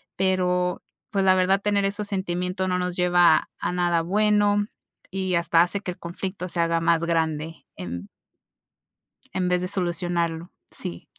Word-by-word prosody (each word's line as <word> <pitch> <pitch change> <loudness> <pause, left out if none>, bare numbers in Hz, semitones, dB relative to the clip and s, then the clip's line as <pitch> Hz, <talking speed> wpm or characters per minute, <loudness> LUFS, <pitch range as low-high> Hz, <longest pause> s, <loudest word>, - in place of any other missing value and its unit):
pero 180 -1 +1 0.3
pues 195 -1 0
la 185 0 +6
verdad 190 +1 +3
tener 205 -1 +1
esos 200 +1 -1
sentimientos 185 -1 -2
no 180 - +1
nos 180 0 -2
lleva 175 -2 +4
a - - -1
nada 175 -2 +1
bueno, 205 +2 +3 0.5
y 190 -1 -1
hasta 170 -1 +4
hace 185 +3 0
que 180 - -4
el 175 - -11
conflicto 180 +2 -5
se 175 -1 -1
haga 165 0 +1
más 165 0 +2
grande 160 -1 -1
en 90 +2 -6 1.3
en 180 -1 0
vez 180 0 +1
de 180 - -2
solucionarlo, 175 -2 -2 0.2
sí. 85 0 -6
180 Hz, 155 wpm, -24 LUFS, 170-190 Hz, 1.3 s, la